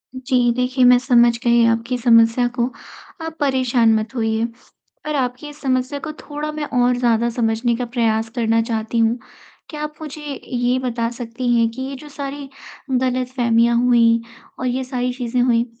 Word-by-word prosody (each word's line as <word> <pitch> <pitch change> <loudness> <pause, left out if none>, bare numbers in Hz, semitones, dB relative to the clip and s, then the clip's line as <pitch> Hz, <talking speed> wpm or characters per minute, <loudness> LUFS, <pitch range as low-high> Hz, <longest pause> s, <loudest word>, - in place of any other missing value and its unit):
जी 250 -2 +1
देखिए, 250 +1 +1
मैं 250 0 +7
समझ 240 -2 +4
गई 235 -1 +4
आपकी 230 +2 0
समस्या 230 0 +4
को, 240 - +2 0.6
आप 320 0 -6
परेशान 255 -5 +2
मत 220 +3 -2
होइए, 225 0 0 0.6
पर 305 -1 -2
आपकी 255 +2 -2
इस 295 - -14
समस्या 260 +1 -1
को 315 - -6
थोड़ा 300 +1 -5
मैं 305 -1 -4 0.2
और 245 0 +3
ज़्यादा 235 -1 +2
समझने 230 0 0
का 245 +1 -3
प्रयास 225 -2 0
करना 225 -1 +2
चाहती 225 0 -3
हूँ। 225 +2 +2 0.5
क्या 300 -2 -7
आप 300 0 -5
मुझे 305 0 -7 0.2
ये 245 0 0
बता 235 -2 -2
सकती 240 +1 -5
हैं 230 -1 +3
कि 260 +3 -8
ये 270 +1 -4
जो 295 +2 -12
सारी 280 -1 -6 0.4
गलतफ़हमियाँ 250 -2 +1
हुईं 230 -2 +4 0.4
और 255 - -2
ये 255 +2 -1
सारी 250 -1 -2
चीज़ें 245 -1 -1
हुईं 240 -1 +2
245 Hz, 170 wpm, -20 LUFS, 230-260 Hz, 0.6 s, मैं